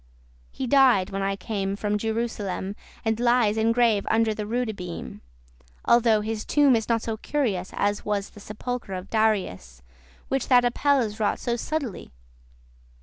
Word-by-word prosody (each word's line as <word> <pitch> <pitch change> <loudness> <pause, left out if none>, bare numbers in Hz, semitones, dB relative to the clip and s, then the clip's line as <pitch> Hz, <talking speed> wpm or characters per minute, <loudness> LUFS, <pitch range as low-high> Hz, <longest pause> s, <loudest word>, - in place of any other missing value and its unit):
<20> - - -26
He 265 - -2
died 250 -7 +4
when 195 0 -3
I 195 0 0
came 195 -1 -3
from 210 0 -1
Jerusalem, 215 -3 -3 0.3
And 220 0 0
lies 240 -3 +3
in 225 +1 +2
grave 230 -4 +2
under 225 -1 +2
the 210 -1 -5
*roode 235 -1 -1
beam:* 175 - -7 0.2
*cross* - - -31 0.3
Although 230 -3 +4
his 215 0 -3
tomb 285 -4 +4
is 225 -1 -2
not 230 -1 +1
so 225 -1 -3
curious 215 -9 -1
As 205 0 0
was 205 -1 -2
the - - -14
sepulchre 220 +1 -5
of 185 +1 -8
Darius, 190 - -1 0.4
Which 270 -2 -1
that 245 -2 +5
Apelles 245 -3 +1
wrought 210 - +1
so 240 -1 -2
subtlely. 270 - -4
220 Hz, 165 wpm, -25 LUFS, 200-240 Hz, 0.4 s, that